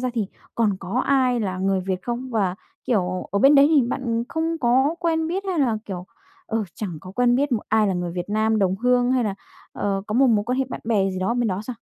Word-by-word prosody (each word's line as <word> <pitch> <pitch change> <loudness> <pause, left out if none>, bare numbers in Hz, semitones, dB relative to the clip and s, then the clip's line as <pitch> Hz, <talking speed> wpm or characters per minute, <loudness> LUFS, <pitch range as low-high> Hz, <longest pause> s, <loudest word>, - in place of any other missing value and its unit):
ra 255 0 -1
thì 220 -4 0 0.3
còn 215 -4 +1
có 195 +8 -1
ai 255 -3 +2
là 190 -4 -2
người 190 0 +1
Việt 185 0 -3
không? 245 +2 -4
Và, 200 -6 0 0.3
kiểu, 185 -5 -1
ở 200 - 0
bên 275 +7 +6
đấy 280 0 +7
thì 305 -4 +4
bạn 235 -3 -2
không 325 0 -2
có 265 +4 +2
quen 325 -2 0
biết 380 +4 -2
hay 370 -3 -1
là, 245 -6 +2
kiểu, 185 -2 -6 0.4
ờ, 225 -1 -1
chẳng 180 -7 -5
có 185 - -10
quen 245 +3 +3
biết 285 +1 0
một 225 - 0
ai 220 0 +3
là 195 - 0
người 175 -1 -3
Việt 175 +1 -4
Nam 215 +1 +1
đồng 190 -2 +1
hương 245 +3 +2
hay 255 -2 +2
là, 205 -2 -1 0.4
ờ, 195 -1 -2
có 210 - -4
một 265 +3 +5
mối 215 -4 +2
quan 250 +3 -1
hệ 265 - +2
bạn - - -6
bè 205 -4 +1
gì 185 - -4
đó 190 +6 0
bên 240 -2 +1
đó 185 0 -2
sao? 250 +3 -6
230 Hz, 255 wpm, -23 LUFS, 195-255 Hz, 0.4 s, đấy